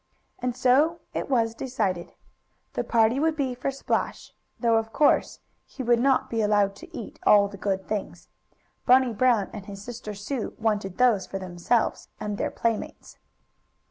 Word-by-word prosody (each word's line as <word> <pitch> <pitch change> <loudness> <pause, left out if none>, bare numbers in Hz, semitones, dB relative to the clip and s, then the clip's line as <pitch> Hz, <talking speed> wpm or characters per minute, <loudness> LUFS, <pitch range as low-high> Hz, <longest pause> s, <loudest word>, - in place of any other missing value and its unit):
And 250 -1 -2
so 295 +8 +3
it - - -3
was 230 -4 +2
decided. 215 -9 -3 0.6
The - - -1
party 230 +2 +3
would 320 +1 +2
be 270 -4 -1
for 250 +2 -3
Splash, 275 0 -3 0.3
though 230 -2 +3
of 225 0 -2
course 295 +5 +2 0.3
he 265 - -7
would 240 -1 +3
not 265 +1 +2
be 225 -1 -1
allowed 205 -2 +2
to - - -11
eat 225 - -8
all 205 -1 +6
the 200 - -10
good 195 -1 -2
things. 210 -2 -4 0.6
Bunny 255 -1 +5
Brown 230 -3 +2
and 205 -3 -8
his 200 -1 -8
sister 215 -2 -7
Sue 215 +4 -4
wanted 210 -4 -1
those 235 -7 +3
for 195 - -4
themselves 185 +5 -1
and 210 -1 -4
their - - 0
playmates. 230 -2 -3
225 Hz, 165 wpm, -26 LUFS, 205-250 Hz, 0.6 s, all